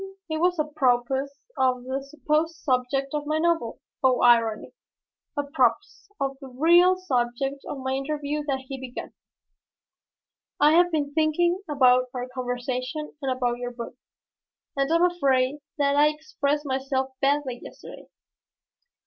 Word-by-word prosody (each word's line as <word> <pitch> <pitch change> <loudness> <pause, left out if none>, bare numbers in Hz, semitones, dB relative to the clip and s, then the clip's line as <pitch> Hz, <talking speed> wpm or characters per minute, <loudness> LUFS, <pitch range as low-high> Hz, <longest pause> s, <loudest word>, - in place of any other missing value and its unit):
It 315 - 0
was 355 0 +2
apropos 265 -3 +1 0.3
of 255 -1 +2
the 265 +2 -3
supposed 310 +3 -1
subject 270 -1 -1
of 295 -1 -3
my 305 +1 +1
novel 325 -8 0 0.2
oh, 255 -1 +3
irony! 230 -3 +3 0.6
apropos 280 -5 +3 0.4
of 275 0 -2
the 270 - -8
real 345 +8 +5
subject 270 -4 -1
of - - -5
my 265 0 -3
interview 290 +2 -2
that 265 -2 -1
he 270 0 -6
began. 255 -1 -7 1.5
"I 295 +1 +6
have 350 +2 +4
been 290 -3 -1
thinking 345 +4 +2
about 255 -3 +4
our 250 0 -3
conversation 255 +4 -4
and 270 -2 -1
about 245 -2 -1
your 245 0 -5
book, 235 -1 -7 0.8
and 275 +2 0
I - - +4
am 335 - +3
afraid 280 -5 +1 0.2
that 280 -1 +2
I 295 +1 +6
expressed 300 -1 -2
myself 265 0 -1
badly 275 -3 +1
yesterday. - - -11
275 Hz, 140 wpm, -25 LUFS, 255-305 Hz, 1.5 s, I